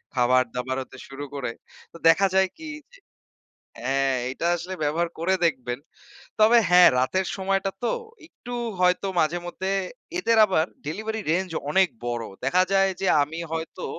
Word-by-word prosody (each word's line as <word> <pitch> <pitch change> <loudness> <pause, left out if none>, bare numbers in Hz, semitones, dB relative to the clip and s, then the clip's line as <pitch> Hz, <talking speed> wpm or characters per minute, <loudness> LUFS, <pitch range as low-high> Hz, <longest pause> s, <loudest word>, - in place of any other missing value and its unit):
খাবার 130 0 +4
দাবার 130 +1 -2
হতে 130 - -15
শুরু 135 +1 -7
করে। 135 -4 -3 0.4
তো - - -10
দেখা 195 +4 +5
যায় 190 -1 +4
কি? 320 0 -7 0.2
যে - - -17 0.9
হ্যাঁ, 135 0 +1 0.2
এটা 165 - -3
আসলে 180 +3 -6
ব্যবহার 165 +4 0
করে 180 +3 +1
দেখবেন। 125 -5 -2 0.6
তবে 220 +3 +6
হ্যাঁ 180 0 +8
রাতের 185 +9 0
সময়টা 195 0 0
তো 240 - +1 0.3
একটু 245 -7 -10 0.3
হয়তো 180 +2 +2
মাঝে 160 +2 +1
মধ্যে 190 +2 -3 0.5
এদের 230 -9 +2
আবার 185 -6 +1 0.2
ডেলিভারি 220 +6 -3
রেঞ্জ 185 +1 0 0.2
অনেক 190 +2 +4 0.2
বড়। 120 -1 -2 0.2
দেখা 180 +7 +4
যায় 195 0 +4
যে 195 - 0 0.2
আমি 160 +3 -6
হয়তো 165 +2 -5
175 Hz, 155 wpm, -25 LUFS, 135-190 Hz, 0.9 s, হ্যাঁ